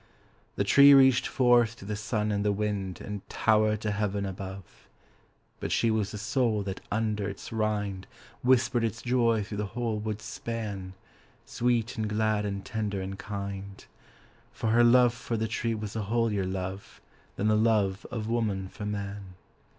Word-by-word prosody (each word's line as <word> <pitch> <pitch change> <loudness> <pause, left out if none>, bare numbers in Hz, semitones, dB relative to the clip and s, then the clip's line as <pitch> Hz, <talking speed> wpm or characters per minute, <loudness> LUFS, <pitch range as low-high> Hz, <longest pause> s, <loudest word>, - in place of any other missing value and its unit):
The - - +1
tree 140 0 +8
reached 130 -2 +5
forth 120 -3 +3
to 100 - -12
the 105 +1 -3
sun 110 0 -1
and 100 0 0
the 105 - +2
wind 100 -2 -2
And 105 -1 -5
towered 110 -1 +2
to 105 - -1
heaven 100 -1 -1
above. 95 -1 -8 0.7
But - - -4
she 115 - +2
was 110 -2 0
the 105 - -6
soul 115 -1 0
that 95 -1 -5
under 105 -2 -1
its 100 - -8
rind 105 -3 -2 0.3
Whispered 125 -1 +3
its 110 0 -2
joy 115 -3 +2
through 105 +1 -6
the 105 - -1
whole 115 -3 -1
wood's 110 0 -4
span, 105 -5 -5 0.5
Sweet 120 0 0
and 110 -1 -1
glad 105 -1 +1
and 100 -1 -4
tender 105 -3 -2
and 95 +1 -5
kind; 100 -1 -6 0.7
For 110 - -2
her 120 +1 +5
love 120 0 +6
for 115 -1 -4
the 110 +1 -1
tree 115 0 -1
was 105 -1 -6
a 110 - -1
holier 105 -2 0
love 95 +1 -5 0.4
Than 105 - 0
the 110 - +4
love 105 -3 +2
of 110 -3 -4
woman 105 -5 -1
for 105 +1 -6
man. 100 -2 -5
105 Hz, 170 wpm, -28 LUFS, 100-115 Hz, 0.7 s, tree